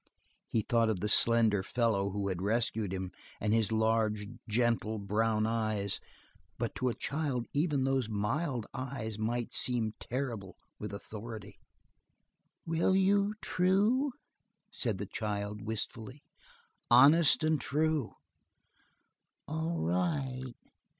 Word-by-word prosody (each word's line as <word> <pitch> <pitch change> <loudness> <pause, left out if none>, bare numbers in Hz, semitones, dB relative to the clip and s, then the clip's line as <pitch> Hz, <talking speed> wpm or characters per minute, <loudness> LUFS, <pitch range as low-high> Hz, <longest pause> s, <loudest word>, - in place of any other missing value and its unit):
He 110 - 0
thought 115 0 +2
of 105 -5 0
the 105 - -1
slender 110 -2 +5
fellow 105 -2 0
who 100 0 -2
had 90 -2 -3
rescued 110 -1 0
him 95 -1 -4 0.3
and 105 +1 +1
his 115 -1 +2
large, 110 -1 +1 0.2
gentle 115 -1 +1
brown 110 +2 +1
eyes, 110 -3 0 0.6
but - - -2
to 130 - +1
a 120 - -3
child 140 -5 -2
even 145 -2 +1
those 135 -3 +1
mild 115 +4 -1
eyes 125 -5 -5
might 120 +2 -2
seem 115 -4 +1
terrible 115 -7 -4 0.2
with 105 -1 -5
authority. 105 0 -8 1.1
"Will 165 +3 +2
you, 200 +2 +3
true?" 205 +10 +2 0.6
said 115 - -1
the 100 - -4
child, 105 0 -3
wistfully. 110 +4 -5 0.7
"Honest 145 +7 +6
and 155 -1 +2
true." 155 -3 0 1.3
"All 160 +2 -2
right." 130 - -1
115 Hz, 115 wpm, -31 LUFS, 105-140 Hz, 1.3 s, Honest